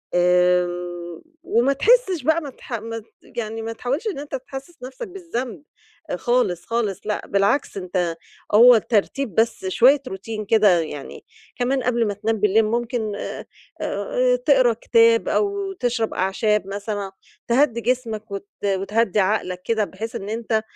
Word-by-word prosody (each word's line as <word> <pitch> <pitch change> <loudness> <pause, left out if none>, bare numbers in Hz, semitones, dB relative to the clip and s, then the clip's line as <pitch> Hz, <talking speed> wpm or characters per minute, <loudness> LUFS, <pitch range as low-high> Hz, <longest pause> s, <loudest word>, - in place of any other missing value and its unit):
آمم، 175 -1 +1 0.2
وما 245 +4 +2
تحسش 390 - +3
بقى 315 +3 +2
ما 290 - -6
تح 255 - -11
ما 225 0 -4
ت - - -16 0.2
يعني 225 -1 -5
ما 225 +1 -4
تحاولش 260 - -3
إن 390 -9 -3
أنت 285 -1 -5
تحسس 270 +4 -9
نفسك 270 - -7
بالذنب 310 - -5 0.5
آآ - - 0
خالص 240 -9 0
خالص 225 -5 -1
لأ، 210 - -3
بالعكس 200 +6 +1
أنت 180 -2 -2 0.4
هو 245 +2 +9
الترتيب 225 +3 0
بس 225 -3 +1
شوية 255 +8 +5
routine 215 +3 -6
كده 205 -6 +5
يعني. 145 -3 -8 0.3
كمان 255 +1 0
قبل 235 -2 +1
ما 205 - -1
تنام 220 +2 -1
بالليل 210 +2 +3
ممكن 230 -1 -2
آآ - - -6 0.4
آآ - - +1
تقرا - - +4
كتاب 460 -2 +3
أو 400 -1 0
تشرب 245 - -1
أعشاب 195 +2 +1
مثلًا، 200 0 -4 0.4
تهدّي 235 -1 +2
جسمك 225 -4 -2
وت 200 0 -6 0.2
وتهدّي 200 +2 +1
عقلك 185 -2 0
كده 225 -2 +1
بحيث 220 +7 -7
إن 205 -2 -5
أنت 225 0 -1
225 Hz, 150 wpm, -22 LUFS, 200-265 Hz, 0.5 s, هو